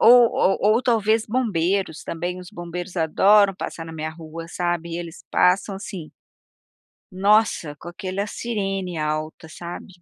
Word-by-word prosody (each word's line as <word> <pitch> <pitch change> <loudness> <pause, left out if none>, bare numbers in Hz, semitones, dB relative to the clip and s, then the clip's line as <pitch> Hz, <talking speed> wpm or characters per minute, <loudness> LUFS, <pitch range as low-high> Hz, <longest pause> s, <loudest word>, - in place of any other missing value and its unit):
Ou 240 +1 +8
ou 195 - +2 0.2
ou 240 - +2
talvez 220 -2 +2
bombeiros, 195 -7 0
também. 175 +2 -3
Os 180 - -11
bombeiros 175 +2 -6
adoram 195 +5 +5
passar 165 -2 -6
na 165 - -8
minha 155 0 -4
rua, 165 0 -9
sabe, 175 -1 -2
e 170 - -3
eles 170 -2 -8
passam 190 +2 +3
assim 190 -5 -7 1.0
Nossa, 195 -5 +2
com 170 - -12
aquela 190 +2 -3
sirene 195 -7 -3
alta, 155 +1 -3
sabe? 175 +3 -8
180 Hz, 145 wpm, -23 LUFS, 165-205 Hz, 1.0 s, Ou